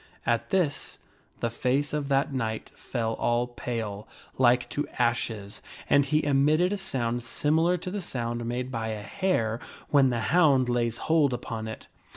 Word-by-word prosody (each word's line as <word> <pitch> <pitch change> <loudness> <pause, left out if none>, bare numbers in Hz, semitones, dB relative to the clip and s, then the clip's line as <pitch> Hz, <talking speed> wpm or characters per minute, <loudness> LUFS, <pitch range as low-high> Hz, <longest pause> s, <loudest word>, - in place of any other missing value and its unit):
At 115 -1 0
this, 175 -7 0 0.4
the 115 - 0
face 135 +5 0
of 150 -2 -1
that 135 0 +1
knight 110 -4 -3
fell 115 -3 -3
all 120 +1 +2
pale, 115 -4 -5 0.3
like 125 -1 +4
to 145 - -2
ashes, 115 -4 -1 0.3
and 140 0 +4
he 150 +2 +1
emitted 150 +6 +3
a - - -1
sound 120 -9 -1
similar 160 +8 +1
to 180 +1 -6
the 205 0 -3
sound 120 -7 -3
made 125 +2 -3
by 115 -3 -2
a 110 -2 -4
hare 115 - 0 0.3
when 140 -3 +5
the 120 -1 0
hound 140 -8 +5
lays 120 -1 +1
hoi 160 0 +3
upon 115 -3 -4
it. 110 - -7
125 Hz, 165 wpm, -27 LUFS, 115-145 Hz, 0.4 s, when